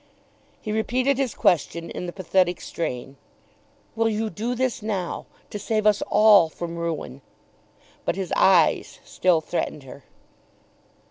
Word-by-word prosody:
He 215 - -5
repeated 250 +5 +1
his 265 -5 -1
question 170 0 +1
in 180 - -5
the - - -4
pathetic 185 -1 +1
strain. 135 -4 -5 0.8
"Will 225 0 +2
you 220 0 -2
do 235 +4 -3
this 255 -2 -1
now, 200 -5 -3 0.2
to 205 - -5
save 215 +1 -1
us 210 -1 +4
all 210 -6 +6
from 170 +1 -6
ruin?" 165 -5 -4 0.8
But - - -1
his 190 -2 -4
eyes 180 -5 +3
still 175 -3 +2
threatened 155 -3 -3
her. 135 +1 -12
190 Hz, 135 wpm, -24 LUFS, 170-220 Hz, 0.8 s, all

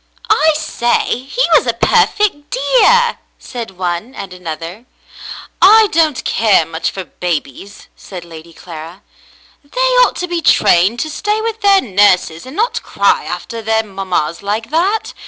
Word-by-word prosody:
"I 320 -7 +4
say! 300 -6 -1
He - - -1
was - - +4
a - - 0
perfect 370 -9 +1
dear 485 -1 +2
!" - - -44
said 230 -7 -8
one 180 +7 -4
and 190 -2 -8
another. 170 +4 -8 0.8
"I 430 +2 +6
don't 310 -4 +1
care 210 -7 +2
much 165 +1 -3
for 190 - -7
babies," 175 +2 -6
said 180 -3 -10
Lady 165 0 -12
Clara. 165 +3 -11 0.6
"They 285 +12 -8 0.2
ought - - +3
to 360 - -4
be 345 -1 -3
trained 200 - +3
to 315 - -3
stay 420 +7 -2
with 450 0 -4
their 395 -1 +4
nurses 190 -3 +1
and 265 - -10
not 455 +5 -1
cry - - 0
after 230 -1 -6
their 220 0 0
mammas 190 -6 -3
like 215 +4 -4
that. 380 +7 0
225 Hz, 155 wpm, -15 LUFS, -, 0.8 s, I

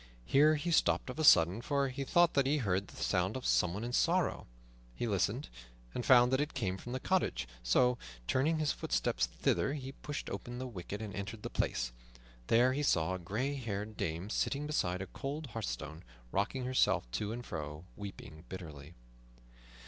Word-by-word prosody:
Here 150 - +5
he 170 +4 -2
stopped 150 - +2
of 150 - -9
a - - +1
sudden, 90 - +6
for 140 +1 0
he 135 +2 -4
thought 175 +5 +4
that 135 -1 +3
he 150 +2 +3
heard 100 -6 0
the - - -14
sound 95 +4 +1
of 130 - -7
someone 90 +5 +2
in 120 +1 -4
sorrow. 175 +6 +1 0.5
He 120 - -2
listened, 105 +6 0 0.5
and 125 - -3
found 125 0 +6
that 130 - +3
it 150 -1 -3
came 95 -8 -1
from 120 +5 -7
the 130 - -2
cottage; 125 - 0
so, 125 - +3 0.3
turning 150 - +2
his 155 -2 +1
footsteps - - 0
thither, 100 - 0
he 135 -2 -6
pushed 145 +1 -6
open 120 0 -5
the 130 - -4
wicket 105 -2 -6
and 105 -2 -6
entered 100 +2 -6
the - - -5
place. - - -1 0.6
There 125 +3 +4
he 145 - -1
saw 90 - +2
a 95 - -3
gray 110 +11 -2
haired 110 -5 -4
dame 85 +4 -3
sitting 145 +1 0
beside 95 -11 0
a - - -5
cold 140 - -5
hearthstone, 80 -8 -5 0.3
rocking 125 +6 -1
herself 130 0 +3
to 105 - -2
and 120 +1 -5
fro 75 -1 -5
and 80 +4 -12
weeping 90 -5 -9
bitterly. 80 -4 -9
120 Hz, 185 wpm, -33 LUFS, 95-135 Hz, 0.6 s, sudden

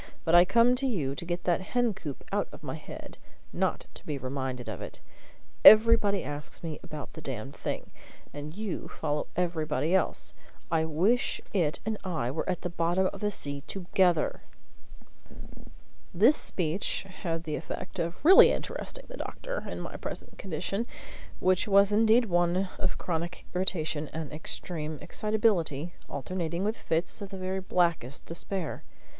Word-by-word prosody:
"But 165 - +1
I 175 +1 +8
come 235 +5 +5
to 270 +1 0
you 155 - -1
to 155 - -6
get 175 0 -3
that 175 0 +2
hen 240 +3 +1
coop 150 -7 -7
out - - 0
of - - -12
my - - -4
head, - - -9 0.3
not - - 0
to - - -11
be 150 - -3
reminded 130 -1 -4
of - - -5
it. - - -5 0.6
Everybody 215 -2 +8
asks 145 +3 -5
me 160 -3 -4
about 150 -2 -8
the 160 - -9
damned 135 0 -5
thing, - - -4 0.4
and 150 +4 -7
you 210 -4 -4
follow 150 0 -2
everybody 165 -2 0
else. 190 -3 +1 0.4
I 160 -1 +2
wish 185 +11 +2
it 165 -7 +1
and 220 -1 -2
I 160 - -1
were 155 - -3
at 180 - -1
the 180 - -2
bottom 175 +2 +1
of - - -8
the 210 - 0
sea 140 -8 0
together!" 180 -3 +1 1.7
This 230 - +7
speech 180 - +1
had 165 -3 -4
the 155 -2 -3
effect - - -6
of 170 - -3
really 380 +3 +9
interesting - - -3
the - - -9
doctor - - -5
in - - -5
my - - -6
present - - -5
condition, 195 +6 -2 0.5
which 185 +3 +2
was 200 0 +5
indeed 225 +3 +5
one 175 0 +1
of - - -1
chronic 170 0 -3
irritation 160 -5 0
and 160 -3 -5
extreme 155 0 -4
excitability, 180 -8 0 0.2
alternating 170 +4 -3
with 215 +2 0
fits 165 -1 -1
of 200 - -5
the 195 - -7
very 185 +1 -2
blackest 170 -8 0
despair. 170 0 -3
175 Hz, 160 wpm, -29 LUFS, 155-200 Hz, 1.7 s, really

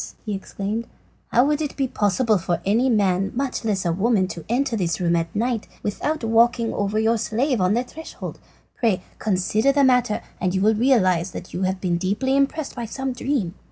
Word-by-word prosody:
he 210 - -2
exclaimed, 200 +3 -4 0.4
"how 245 +3 +4
would 300 +1 +1
it 295 - -4
be 270 -2 +1
possible 215 -1 +1
for 175 0 -1
any 230 +7 +3
man, 195 -4 +2
much 265 -1 -2
less 200 -4 -1
a 170 - +2
woman, 195 0 +2
to 170 -3 -7
enter 245 +1 +1
this 170 -7 -1
room 170 -1 +2
at 165 0 -2
night 230 0 -1 0.2
without 295 +8 -2
walking 230 +1 +3
over 205 +1 -1
your 225 +1 +2
slave 235 +2 0
on 185 +3 +3
the 240 - +1
threshold? 320 +5 -8 0.4
Pray 215 -7 +1 0.2
consider 215 +5 +2
the 280 0 +3
matter, 250 -4 +3 0.2
and 185 0 0
you 190 - +1
will 215 +2 +4
realise 200 -7 +3
that 180 - -9
you 180 - -3
have 190 0 -3
been 175 -2 0
deeply 205 +9 0
impressed 280 +2 0
by 240 -2 -5
some 265 +3 -3
dream." 245 -9 -1
220 Hz, 195 wpm, -23 LUFS, 190-255 Hz, 0.4 s, how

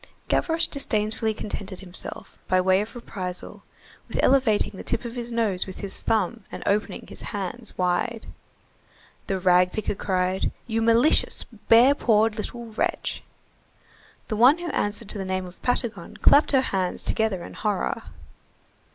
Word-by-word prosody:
Gavroche 330 0 +2
disdainfully 220 -5 -1
contented 205 -3 -5
himself, 180 -2 -7
by 185 - +3
way 185 +1 +3
of 215 +4 -7
reprisal, 185 -6 -5 0.5
with - - -5
elevating 255 -6 +3
the 190 - -8
tip 235 0 -2
of 235 - -5
his 240 -1 -5
nose 215 -6 +2
with 190 - -8
his 200 - -4
thumb 225 +2 0
and - - -7
opening 210 +2 -1
his - - -7
hand 205 +3 -4
wide. 185 +6 0 1.0
The 195 - 0
rag 180 0 +4
picker 215 - -2
cried:— 185 -1 0
"You 225 -1 -1
malicious, 230 +6 +3 0.3
bare 240 +5 +7
pawed 220 -5 +2
little 235 +2 -5
wretch!" 220 -1 -2 1.1
The 215 - -2
one 255 +8 +7
who 345 -1 -4
answered 205 +1 -2
to 205 - 0
the - - -2
name 185 0 -2
of 180 0 -13
Patagon 240 -2 -1
clapped 290 - +5
her 270 -2 +4
hands 190 -7 -2
together 220 -6 0
in - - -10
horror. 210 -3 -1
215 Hz, 150 wpm, -25 LUFS, 190-235 Hz, 1.1 s, bare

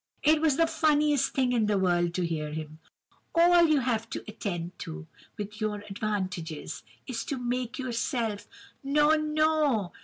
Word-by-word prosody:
It 310 +1 +4
was 305 -4 +3
the 330 - +5
funniest 300 -3 +2
thing 255 -2 +2
in 230 -4 +2
the 210 -1 +2
world 175 -2 +1
to 180 - 0
hear 155 -3 -3
him: 155 0 -6 0.6
'All 345 0 +6
you 305 -3 +3
have 230 -3 -1
to - - -5
attend 180 -5 -5
to, 75 0 -7 0.3
with 210 +1 -6
your 210 -1 -2
advantages 185 -6 -3 0.2
is 230 -3 -4
to—make 250 -2 -2
yourself—no, 265 - -1
no! 305 - +1
235 Hz, 145 wpm, -28 LUFS, 190-300 Hz, 0.6 s, All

